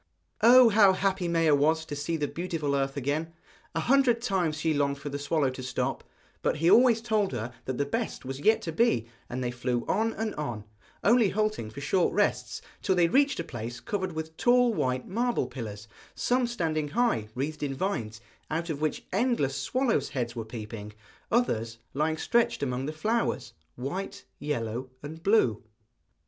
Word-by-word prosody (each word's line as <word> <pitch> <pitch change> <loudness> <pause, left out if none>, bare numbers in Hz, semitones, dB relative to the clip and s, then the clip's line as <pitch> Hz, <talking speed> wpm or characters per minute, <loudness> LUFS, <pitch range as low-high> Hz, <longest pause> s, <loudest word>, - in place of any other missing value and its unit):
Oh! 245 +2 +8
how 200 -3 +6
happy 190 -1 0
Maia 165 -2 +3
was 160 +3 +2
to 145 - -5
see 150 +3 -2
the 150 -2 -1
beautiful 165 -5 -2
earth 135 0 -1
again! 150 +5 -2 0.4
A 165 - +1
hundred 250 +1 +4
times 185 -9 0
she 160 0 +1
longed 140 -1 +1
for 140 +1 -6
the 145 0 -4
swallow 145 -1 +1
to 130 - -8
stop, 130 - -2 0.4
but - - +1
he 165 +3 +3
always 235 -2 +6
told 215 - +1
her 120 +1 -4
that 130 -1 -3
the 145 - +1
best 225 - -3
was 135 +1 -5
yet 220 +9 +3
to 165 - -3
be; 155 - +2 0.2
and 125 +1 -3
they 120 - -1
flew 125 -1 -2
on 225 +3 +1
and 220 -1 -3
on, 120 -8 -4 0.4
only 230 -1 +5
halting 215 - -1
for 135 +6 -9
short 175 +5 +1
rests, - - 0 0.2
till 190 - +1
they 170 -2 +4
reached 280 - +3
a - - -1
place 120 -1 -6
covered 190 - -3
with 160 0 -5
tall 245 -1 +4
white 130 -8 -1
marble 235 - 0
pillars, 115 -4 -7 0.3
some 250 0 +1
standing 160 -10 -1
high, 220 - +1
wreathed 150 +4 -3
in 140 -2 -2
vines, 120 - -3 0.3
out 165 +2 -2
of 150 -1 -5
which 155 -1 -1
endless 200 - +1
swallows' 245 - 0
heads 120 -3 -3
were 115 - -3
peeping; 110 -2 -8 0.4
others 115 - +1 0.2
lying 155 +3 0
stretched 235 -3 +1
among 130 0 -2
the - - -2
flowers, 220 +10 -1 0.2
white, 175 +10 -5
yellow, 130 -3 -3
and 160 +3 -8
blue. 165 - +3
155 Hz, 180 wpm, -28 LUFS, 130-210 Hz, 0.4 s, Oh